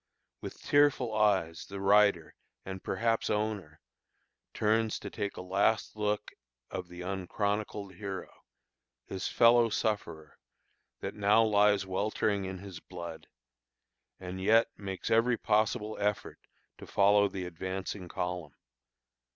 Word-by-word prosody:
With - - -8
tearful 145 -5 +3
eyes 95 -7 +1
the 100 0 -7
rider 100 -4 +4 0.3
and 95 -1 -7
perhaps 115 0 0
owner 105 -8 -2 0.7
turns 110 +1 +1
to 100 - -8
take 100 0 -4
a - - -5
last 100 +5 +1
look 105 -1 -1 0.4
of 90 - -5
the 90 0 -10
"unchronicled 100 +2 -3
hero," 95 0 -6 0.7
his 95 - -4
fellow 115 0 +5
sufferer, 85 -9 -3 0.6
that - - -4
now 105 +2 +4
lies 105 -2 +3
weltering 100 +1 0
in 95 0 -5
his 95 -1 -9
blood, 85 -3 -9 0.9
and 95 0 -6
yet 115 +4 +4
makes 95 -3 -5
every 115 +2 +4
possible 110 0 +1
effort 105 0 -2 0.4
to - - -10
follow 100 +1 +4
the 95 -2 -5
advancing 95 +2 -5
column. 90 -4 -4
100 Hz, 120 wpm, -30 LUFS, 95-105 Hz, 0.9 s, fellow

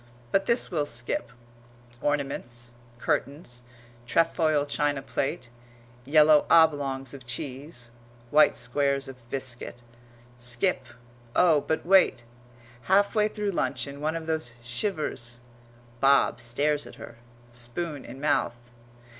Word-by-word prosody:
[But 195 0 +2
this 235 -3 +2
we'll 150 -4 0
skip; 120 -2 -3 0.7
ornaments, 130 -5 -2 0.3
curtains, 130 -1 -2 0.5
trefoil 155 +1 +2
china 145 -1 0
plate, 125 -3 -3 0.6
yellow 150 +1 +6
oblongs 145 -5 +3
of 135 -3 -10
cheese, 125 0 -5 0.4
white 155 +1 +5
squares 140 +3 0
of 125 -3 -12
biscuit 125 -2 -5 0.5
skip 125 +5 0 0.5
oh, 165 -5 +5
but 160 - -2
wait! 185 -9 +4 0.6
Halfway 205 +2 +3
through 210 -1 -2
luncheon 140 -5 -2
one 155 +2 0
of 165 -1 -4
those 160 -7 -2
shivers; 120 - -3 0.6
Bob 135 -2 +4
stares 145 +5 0
at - - -12
her, 120 - -11 0.3
spoon 120 +6 -4
in 130 - -10
mouth. 145 -4 +1
140 Hz, 110 wpm, -27 LUFS, 120-160 Hz, 0.7 s, yellow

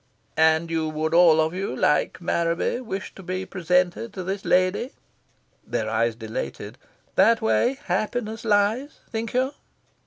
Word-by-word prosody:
"And 160 +1 +3
you 160 -1 0
would 155 +1 -2
all 170 -2 +6
of 160 +1 +1
you, 185 -7 -3
like 150 +3 +1
Marraby, 170 +6 0
wish 195 -6 -5
to - - -11
be 185 +1 -4
presented 180 +4 0
to 185 - -5
this 195 +2 -3
lady?" 185 +8 +2 0.7
Their 110 -2 -2
eyes 115 +1 +1
dilated. 110 -1 -6 0.3
"That 230 0 +5
way 240 +3 +2
happiness 220 0 -2
lies, 220 +6 +1
think 225 0 -4
you?" 260 +2 +1
185 Hz, 145 wpm, -24 LUFS, 160-220 Hz, 0.7 s, all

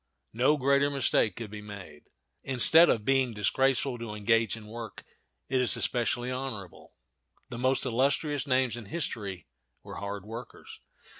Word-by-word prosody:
No 130 +7 +3
greater 140 +1 +3
mistake 130 -7 +1
could 115 -3 -7
be 105 0 -7
made. 100 -8 -11 0.4
Instead 135 +7 +5
of 105 -2 +1
being 135 -4 +2
disgraceful 130 +4 +1
to 115 -2 -6
engage 115 +1 +1
in 110 - -11
work, 115 0 -9 0.4
it 130 -1 +1
is 125 - +4
especially 120 +1 -1
honorable. 125 -8 -7 0.5
The 120 -2 -6
most 130 +1 +1
illustrious 140 +3 0
names 130 -3 +1
in 120 -2 -8
history 100 - -4 0.4
were - - -9
hard 100 -1 -6
workers. 115 +3 -10
120 Hz, 145 wpm, -28 LUFS, 105-135 Hz, 0.5 s, Instead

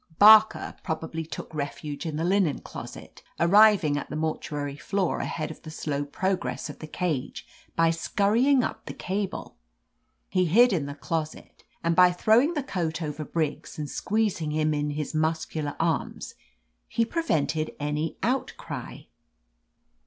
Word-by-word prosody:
"Barker 215 +1 +7
probably 160 0 -4
took 160 - -8
refuge 145 +1 -4
in 155 - -3
the 160 - -1
linen 180 -4 +2
closet, - - -10 0.2
arriving 190 -4 +5
at - - -8
the - - -5
mortuary 150 -2 -3
floor 190 +4 -1
ahead 155 -1 -3
of - - -11
the 160 - -9
slow 145 -2 -3
progress 185 +1 -2
of - - -15
the 155 - -7
cage, 155 -5 -3 0.3
by 165 0 +4
scurrying 225 +10 +2
up - - -5
the - - -6
cable. 195 +1 -4 0.7
He 185 -1 +1
hid 230 +8 +5
in 150 -6 -1
the 145 - -6
closet, 155 +1 -5 0.2
and 170 0 +2
by 180 0 +7
throw 220 +6 +4
ing 320 +6 0
the 295 - -1
coat 165 -10 -2
over 150 0 -4
Briggs 155 -1 -3
and 150 -1 -3
squeezing 200 -2 -1
him 155 0 +1
in 145 0 -1
his 150 +1 -4
muscular 155 -1 -1
arms, 165 -2 -1 0.5
he 230 - +1
prevented 160 - -1
any 150 +2 -2
outcry. 255 +4 -3
160 Hz, 150 wpm, -26 LUFS, 150-195 Hz, 0.7 s, Barker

